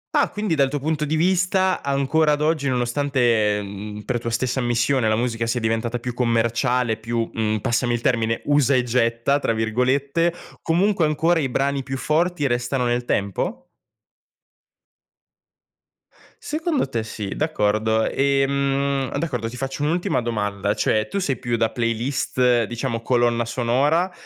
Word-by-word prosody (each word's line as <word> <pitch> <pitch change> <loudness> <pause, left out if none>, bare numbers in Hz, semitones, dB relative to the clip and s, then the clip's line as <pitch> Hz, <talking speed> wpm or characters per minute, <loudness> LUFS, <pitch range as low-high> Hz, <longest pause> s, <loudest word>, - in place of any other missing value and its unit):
Ah, - - +3
quindi 210 -4 -2
dal 140 -3 +2
tuo 145 - -2
punto 150 +1 -1
di 155 +2 -1
vista, 185 +2 +2
ancora 140 +3 +2
ad 145 - -2
oggi 155 -2 +1
nonostante, 120 -4 +1
mhmm, 105 +1 -7
per 120 - -2
tua 115 - -4
stessa 125 +3 -1
ammissione, 120 0 +1
la 110 - +2
musica 115 0 -1
sia 120 +2 0
diventata 115 +1 -1
più 120 +1 -5
commerciale, 120 0 +1
più, 115 0 -2
mhmm, 110 -1 0
passami 120 +1 0
il 120 - -4
termine, 115 -2 0
"usa 145 -2 +3
e 125 - +3
getta," 120 +3 +1
tra 115 - 0
virgolette, 130 +9 +1 0.3
comunque 180 +1 +2
ancora 160 +3 +2
i 135 -4 -1
brani 140 +2 0
più 135 0 -5
forti 160 +2 0
restano 120 0 0
nel 120 0 0
tempo? 175 - -2 2.7
Secondo 310 - -1
te 115 -4 -2
sì, 110 -2 -6
d'accordo, 110 -7 +1
ehm, 140 0 0
d'accordo, 125 -9 -2
ti 125 - -9
faccio 135 +2 -4
un'ultima 165 -3 0
domanda, 105 -3 -1
cioè, 110 0 0
tu 200 - -2
sei 140 -9 -1
più 120 -2 -2
da 115 0 +1
playlist, 120 +1 +1
diciamo 120 +1 -3
colonna 120 -1 +1
sonora, 135 +10 +1
125 Hz, 150 wpm, -22 LUFS, 115-145 Hz, 2.7 s, Ah